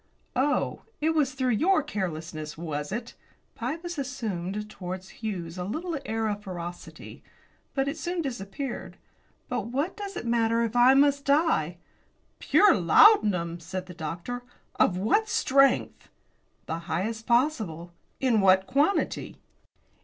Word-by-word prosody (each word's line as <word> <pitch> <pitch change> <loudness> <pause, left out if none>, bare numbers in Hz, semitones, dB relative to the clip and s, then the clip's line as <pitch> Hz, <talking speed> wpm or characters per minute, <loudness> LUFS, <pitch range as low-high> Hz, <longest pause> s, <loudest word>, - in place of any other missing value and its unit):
"Oh, 280 +4 0 0.2
it 315 +2 +2
was 295 -5 +1
through 260 -1 +1
your 315 - +3
carelessness, 160 - -5
was 150 -3 -4
it?" 235 +3 -4 0.4
Pybus 325 +7 -4
assumed 210 -7 -4
towards 185 -2 -7
Hughes 180 -5 -4
a - - -2
little 320 - -3
air 225 0 -1
of 205 -1 -2
ferocity. 175 -3 -8 0.5
But 270 0 +1
it 280 - -3
soon 350 -1 -2
disappeared. 245 0 -5 0.5
"But 245 -4 -2
what 280 +9 -2
does 400 -2 -6
it - - -5
matter 230 0 +2
if 230 0 -3
I 245 +2 +6
must 280 0 +4
die?" 280 - +2 0.6
"Pure 410 -3 +5
laudanum!" 180 - +5
said 185 +2 -5
the 180 - -10
doctor. 170 +10 -5 0.3
"Of 180 - +3
what 420 - +2
strength?" 275 - +2 0.6
"The 165 0 -3
highest 220 +7 -2
possible." 220 - 0 0.3
"In 240 -5 +3
what 190 0 +5
quantity?" 290 - 0
225 Hz, 130 wpm, -27 LUFS, 180-280 Hz, 0.6 s, I